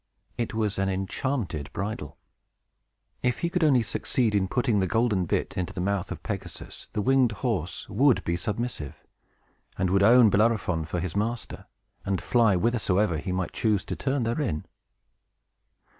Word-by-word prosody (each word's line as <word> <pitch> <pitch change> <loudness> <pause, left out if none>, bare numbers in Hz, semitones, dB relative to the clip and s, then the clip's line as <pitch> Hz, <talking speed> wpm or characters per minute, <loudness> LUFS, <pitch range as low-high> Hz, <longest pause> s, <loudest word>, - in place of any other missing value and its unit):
It 115 -1 -3
was 105 -3 -1
an 95 0 +1
enchanted 95 - -2
bridle. 100 -8 -4 1.0
If 125 -1 0
he 170 - 0
could 180 -1 +1
only 135 -6 +4
succeed 115 0 0
in 100 -2 +2
putting 120 0 +1
the 95 - +1
golden 110 -4 +1
bit - - -1
into 90 -1 -3
the - - -6
mouth 95 0 -1
of - - -6
Pegasus, - - -7
the 105 - -1
winged 130 -2 +3
horse 95 -8 -2
would 125 +5 +3
be 85 - -1
submissive, 105 - -3 0.8
and 95 -1 0
would 100 +1 +3
own 115 +1 +7
Bellerophon 100 -6 +2
for 90 +2 -3
his 90 0 -4
master, 115 +3 -3 0.4
and 95 -1 -1
fly 115 -5 +3
whithersoever 100 -4 +1
he 90 - -4
might 90 -1 -2
choose 105 -4 +1
to - - -4
turn 135 -1 -1
therein. 115 - -1
105 Hz, 160 wpm, -27 LUFS, 95-120 Hz, 1.0 s, own